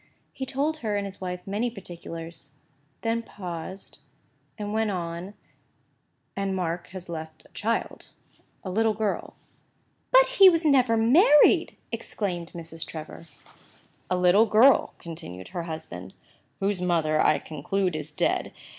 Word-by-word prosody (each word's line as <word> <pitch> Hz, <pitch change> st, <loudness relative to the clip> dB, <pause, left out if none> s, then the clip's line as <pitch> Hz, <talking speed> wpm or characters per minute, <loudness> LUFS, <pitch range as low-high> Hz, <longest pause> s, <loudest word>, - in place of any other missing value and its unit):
He 265 Hz, -, -5 dB
told 295 Hz, +5 st, -1 dB
her 215 Hz, -6 st, -2 dB
and 200 Hz, -, -2 dB
his 195 Hz, -1 st, -8 dB
wife 180 Hz, -1 st, -5 dB
many 210 Hz, +5 st, -1 dB
particulars—then 165 Hz, -, -7 dB
paused—then 190 Hz, +2 st, -9 dB
went 220 Hz, 0 st, +1 dB
on—"And 190 Hz, +2 st, -7 dB
Mark 175 Hz, -1 st, -2 dB
has 185 Hz, -1 st, -8 dB
left 160 Hz, -2 st, -7 dB
a -, -, -20 dB
child—a 225 Hz, -3 st, -5 dB
little 220 Hz, +2 st, +2 dB
girl— 210 Hz, -2 st, -2 dB, 0.7 s
"But -, -, +7 dB
he 450 Hz, -7 st, +7 dB
never 280 Hz, -9 st, +3 dB
was 225 Hz, 0 st, +2 dB
married!" 295 Hz, -, +6 dB
exclaimed 175 Hz, -5 st, -4 dB
Mrs. 165 Hz, -1 st, -6 dB
Trevor. 160 Hz, +1 st, -9 dB, 0.8 s
"A 180 Hz, -, +1 dB
little 180 Hz, +5 st, +5 dB
girl," 235 Hz, +6 st, +5 dB
continued 155 Hz, -, -9 dB
her 170 Hz, -1 st, -4 dB
husband, 95 Hz, -, -7 dB, 0.4 s
"whose 195 Hz, -1 st, 0 dB
mother, 160 Hz, -4 st, +2 dB
I 155 Hz, -, +4 dB
conclude, 180 Hz, +4 st, -2 dB
is 155 Hz, 0 st, -5 dB
dead. 150 Hz, -, 0 dB
185 Hz, 120 wpm, -26 LUFS, 165-220 Hz, 0.8 s, But